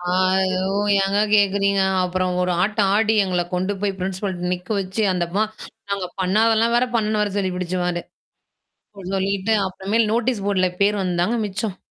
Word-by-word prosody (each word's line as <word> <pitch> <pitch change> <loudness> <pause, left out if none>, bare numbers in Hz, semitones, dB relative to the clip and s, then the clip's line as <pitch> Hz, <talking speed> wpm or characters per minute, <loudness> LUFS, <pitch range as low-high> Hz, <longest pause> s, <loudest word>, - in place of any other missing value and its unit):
ஆ. 180 - -9 0.7
ஓ - - 0 0.3
ஏங்க 195 +1 0 0.2
கேட்கறீங்க. 200 -1 +3 0.2
அப்புறம் 185 0 -1
ஒரு 180 - 0
ஆட்டம் 205 -1 +1
ஆடி, 220 0 +2
எங்கள 180 -2 0
கொண்டு 185 +3 0
போய் 200 -2 -1
பிரின்சிபால் 190 +1 -3 0.2
நிக்க 180 0 -5
வச்சு 190 +3 -3
அந்தம்மா 180 +4 0 0.5
நாங்க 195 -2 -2
பண்ணாதெல்லாம் 225 +4 +2
வேற 250 - +3
பண்ணனு 215 -1 0
வேற 205 - -1
சொல்லி 195 -2 0
பிடிச்சு 180 0 -2
அது. 175 -1 -1 1.0
அ - - -8
சொல்லிட்டு 195 +2 0
அப்புறமேல் 205 +4 0
நோட்டீஸ் 230 -3 0
போர்டுல 190 -2 +2
பேர் 205 0 +2
வந்தாங்க 180 +4 0
மிச்சம். 200 0 -3
195 Hz, 155 wpm, -21 LUFS, 185-210 Hz, 1.0 s, கேட்கறீங்க